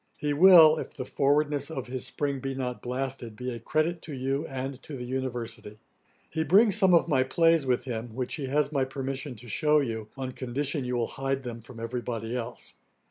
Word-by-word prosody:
He 150 -1 -1
will, 160 -1 +8
if - - -6
the 130 - -5
forwardness 145 +2 +1
of 135 -6 -4
his 130 0 -4
spring 140 -2 -2
be 135 +1 -4
not 125 -2 -4
blasted, 125 -2 -4
be 125 +3 -4
a 115 - -6
credit 155 +7 0
to 155 - -8
you, 135 +4 -2
and 135 0 -5
to 145 - -8
the 125 - -6
University. 120 -4 -4 0.5
He 160 - 0
brings 195 +7 +5
some 190 -4 +5
of 170 - +3
my 135 -5 +3
plays 165 +2 +3
with 125 -1 +1
him, 115 -3 -5
which 125 -1 -2
he 140 -4 -3
has 145 +1 +1
my 140 -3 +1
permission 135 0 -4
to 120 +2 -12
shew 150 +7 +3
you, 110 -6 -3
on 130 -1 -3
condition 135 +2 -2
you 125 0 -2
will 120 -1 +1
hide 135 +1 -3
them 120 -2 -6
from 115 +1 -12
every 120 +2 -3
body 115 0 -4
else. 120 0 -5
130 Hz, 210 wpm, -28 LUFS, 125-150 Hz, 0.5 s, will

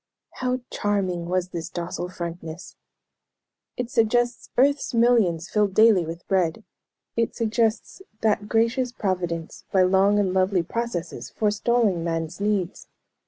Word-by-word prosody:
How 255 0 -1
charming 185 -4 -1
was 180 0 -1
this 170 -3 -5
docile 175 +1 -4
frankness! 170 -1 -7 1.0
"It 245 -1 -3
suggests 240 +2 +1
earth's 280 0 +2
millions 220 -8 +3
filled 205 -2 +1
daily 215 -6 +5
with 165 +1 -8
bread. 185 +1 0 0.5
It 230 -1 0
suggests 230 - 0 0.2
that 210 -1 +1
gracious 235 +2 +1
Providence, 175 -7 -3
by 190 -1 +4
long 195 +2 +4
and 195 -3 +1
lovely 185 -1 +2
processes, 175 - -4
forestalling 210 -3 +1
man's 165 +1 -3
needs. 200 -3 -1
195 Hz, 120 wpm, -24 LUFS, 175-230 Hz, 1.0 s, daily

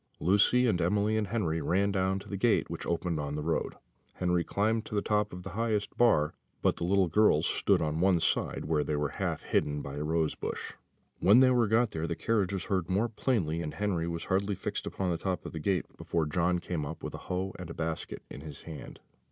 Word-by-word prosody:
Lucy 105 +7 +4
and 100 -7 +2
Emily 105 +5 +2
and 110 -2 0
Henry 90 -7 -1
ran 95 +7 +1
down 95 0 +1
to 95 - -9
the 100 - -4
gate 110 +3 +2
which - - -5
opened 85 -1 -1
on 70 0 -3
the 75 - -3
road. 80 +1 -1 0.4
Henry 90 -1 +1
climbed 110 +4 0
to 105 - -6
the 100 - +2
top 105 0 +1
of 90 0 -8
the 95 - -7
highest 110 -1 -1
bar; 95 -11 +3 0.3
but - - +2
the - - -3
little 95 +1 +3
girls 85 -3 +4
stood - - +2
on 75 +1 -1
one 90 -1 +4
side, - - 0
where 75 -1 +1
they 75 - -1
were 75 0 0
half - - -1
hidden 75 0 0
by 70 +1 -6
a 75 - -2
rose 80 0 +1
bush. - - -5 0.5
When 100 +7 +6
they 130 -1 +6
were 120 -3 +3
got 110 +2 +3
there 80 +1 -3
the 85 - -2
carriage 105 -3 0
was 95 -3 -3
heard 95 -4 -1
more 105 +6 +1
plainly: 95 - 0
and 75 -3 -5
Henry 95 -5 -1
was 85 -1 -3
hardly 100 +2 0
fixed - - -4
upon 95 -2 -2
the 85 - -2
top 90 -4 -2
of - - -5
the 80 - -5
gate 90 +3 0
before 85 -2 -1
John 85 +4 +1
came 85 -2 -3
up, 75 +3 -6
with - - -5
a - - -5
hoe 95 +1 -2
and 90 -2 -7
a - - -5
basket 80 0 -4
in - - -9
his 75 -2 -9
hand. 80 -3 -9
90 Hz, 235 wpm, -30 LUFS, 80-105 Hz, 0.5 s, When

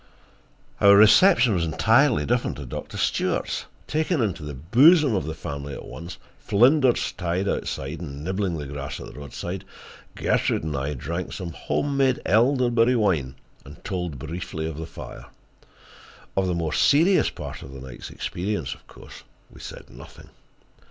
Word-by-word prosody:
Our 100 0 +7
reception 120 - +6
was 85 -3 0
entirely 115 - +3
different 120 +1 0
at 70 -4 -8
Doctor - - -6
Stewart's. - - -1 0.2
Taken 155 +1 0
into 100 -8 -1
the 75 -1 -6
bosom 135 - +5
of 95 - -1
the 80 - -4
family 70 -2 -6
at - - -9
once, 85 +2 -9 0.2
Flinders 125 +4 +3
tied 90 +2 -2
outside 75 -3 -3
and 70 -3 -7
nibbling 95 -1 -2
the 75 - -5
grass 70 0 -6
at - - -8
the - - -11
roadside, 75 +6 -6 0.5
Gertrude - - 0
and 75 -2 -3
I 70 +2 -2
drank 85 +8 -4
some 90 -4 -5
home 140 - -2
made 130 -2 +2
elderberry 120 +1 +3
wine 85 - +1 0.3
and 70 +2 -14
told 90 -7 -3
briefly 80 +2 -5
of 80 -2 -5
the 80 0 -6
fire. - - -10 1.1
Of 95 -1 +1
the 90 - 0
more 80 -2 -2
serious 170 +7 +4
part - - -8
of 65 - -10
the 70 - -9
night's 65 -2 -9
experience, 90 -8 -3
of - - -19
course, - - -13 0.3
we - - -15
said - - -9
nothing. - - -14
90 Hz, 160 wpm, -24 LUFS, 75-120 Hz, 1.1 s, Our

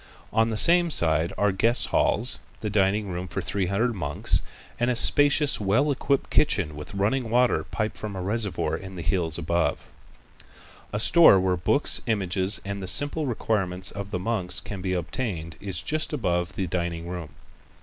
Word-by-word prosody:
On 110 +1 +2
the 110 - -3
same 175 +6 +5
side 80 - +2
are 105 0 +2
guest 115 +6 +2
halls, 120 +4 +2 0.2
the 105 - -3
dining 100 0 +1
room 90 +1 -5
for - - -4
three 95 -3 -2
hundred 115 +6 0
monks, 75 -8 -1 0.4
and 120 - +1
the 125 - +1
spacious, 145 +3 +4
well 110 +9 +1
equipped 140 0 -1
kitchen 90 - +1
with 75 +6 -9
running 110 +5 0
water 120 -9 +2
piped 105 +7 -4
from 105 -2 -6
a 95 - -4
reservoir 105 0 -2
in 95 0 -9
the 85 - -6
hills 80 -1 -1
above. - - -1 1.1
A 105 - -2
store 140 - +6
where 95 -1 +1
books, 140 - +2
images 95 -2 +1
and 100 0 -5
the 95 - -6
simple 145 - +1
requirements 95 -6 -1
of 100 -1 -7
the 100 - -3
monks 90 -2 -2
can 100 -2 -8
be 95 0 -2
obtained 85 -2 -4
is 95 -3 -5
just 155 0 -2
above 90 -10 -1
the 95 - -2
dining 85 -1 -3
room. 85 -4 -7
100 Hz, 175 wpm, -25 LUFS, 90-115 Hz, 1.1 s, store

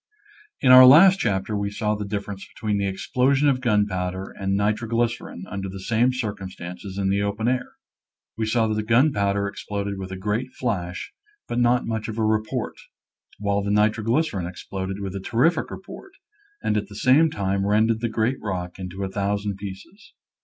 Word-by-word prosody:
In 130 - +5
our 130 0 +11
last 185 +8 +8
chapter 100 -1 -1
we 100 0 -1
saw 105 +1 -1
the 105 -1 -4
difference 100 -1 -5
between 105 -3 -1
the 100 - 0
explosion 135 +8 +1
of 130 -2 +2
gunpowder 95 -5 0
and 95 0 -2
nitro 105 +3 0
glycerin 115 -5 -2
under 95 -1 -5
the 95 +1 -7
same 115 +6 +2
circumstances 95 -5 -6
in 95 -1 0
the 100 +1 +1
open 100 +3 -1
air. 125 0 -1 0.6
We 110 -1 -2
saw 115 0 +2
that 110 - 0
the 110 - 0
gunpowder 105 -4 +2
ex 100 - -7
ploded 100 -1 -3
with 95 0 -6
a 95 - -5
great 110 +6 -2
flash, 90 -8 -3 0.3
but 120 - -2
not 120 +1 +3
much 110 -1 -3
of 110 -1 -5
a 110 - +1
report, 110 0 -1 0.6
while 100 0 0
the 100 - -3
nitroglycerin 105 - +1
exploded 95 +2 -5
with 95 -2 -4
a - - -3
terrific 125 - +1
report, 375 - -10 0.5
and 105 - +1
at 105 -1 -2
the 100 - -12
same 140 +9 +4
time 100 -4 -1
rended 110 +2 +2
the 120 - 0
great 115 +4 -1
rock 90 -3 -4
into 95 +1 -5
a - - -1
thousand 100 0 -2
pieces. 100 - -10
105 Hz, 180 wpm, -24 LUFS, 100-120 Hz, 0.6 s, our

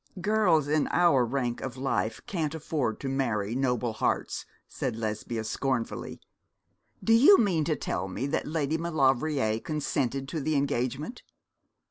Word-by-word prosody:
'Girls 180 -6 +3
in 150 0 +2
our 170 -8 +4
rank 120 -1 -2
of 130 -1 -5
life 115 -5 -1
can't 160 -5 -2
afford 145 -7 -2
to 140 - -3
marry 115 -6 -1
noble 125 -3 0
hearts,' - - -1 0.2
said 125 -4 -3
Lesbia, 110 +1 -3
scornfully. 120 +2 -2 0.8
'Do 225 - +4
you 285 - +8
mean 180 -8 +2
to 155 - +1
tell 95 -8 -3
me 95 +8 -3
that 140 +3 -1
Lady 155 0 -1
Maulevrier 135 -7 +1
consented 140 -2 -2
to 160 - -3
the 155 +2 0
engagement?' 140 - -1
135 Hz, 140 wpm, -28 LUFS, 120-155 Hz, 0.8 s, you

